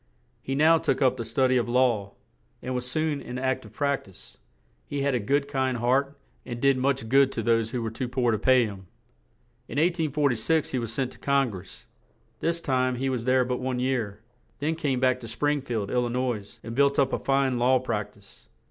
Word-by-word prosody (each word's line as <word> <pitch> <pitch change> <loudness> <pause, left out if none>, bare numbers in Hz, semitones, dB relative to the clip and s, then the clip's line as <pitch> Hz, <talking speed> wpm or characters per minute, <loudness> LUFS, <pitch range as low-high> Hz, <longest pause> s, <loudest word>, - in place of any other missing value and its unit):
He 135 - -3
now 160 +3 +5
took - - 0
up 130 -2 +3
the 115 - -3
stud 125 +3 +1
y 130 - +4
of 120 -1 0
law, 120 -5 +1 0.5
and 130 - -4
was 125 0 -3
soon 155 +1 -1
in 125 - -6
ac 130 0 0
tive - - -14
prac 140 -1 -1
tise; 95 - -18 0.5
he 140 -1 -2
had 140 -1 +1
a 125 - +1
good, 140 +7 0
kind 130 -3 -1
heart, 135 +4 +1 0.3
and 120 -2 -6
did 135 +1 +4
much 135 -2 0
good 135 +2 +4
to 115 - -3
those 115 0 +2
who 120 -1 -3
were 110 - -3
too 125 +3 -4
poor 125 -1 +1
to 110 - 0
pay 130 +2 +4
him. 95 -3 -8 0.8
In - - -6
1846 155 -3 +1
he 130 - 0
was 115 -2 -4
sent 130 +1 -2
to - - -16
Con 140 -3 +2
gress; 95 -2 -11 0.5
this 170 0 -1
time 130 -3 +1
he 135 +2 -1
was 120 -3 -3
there 130 0 +3
but 125 0 -2
one 130 -1 -2
year; 115 -5 -2 0.4
then 150 +3 -1
came 145 -6 -1
back 130 0 +2
to 120 - -9
Spring 145 +5 0
field, 115 -6 -3
Il 125 - +2
li 120 - -1
nois, 120 -5 -3
and 115 - -6
built 140 +3 +3
up 140 -2 +2
a - - 0
fine 135 -2 +1
law 130 +2 +4
prac 115 -5 -3
tise. - - -20
130 Hz, 220 wpm, -26 LUFS, 120-140 Hz, 0.8 s, now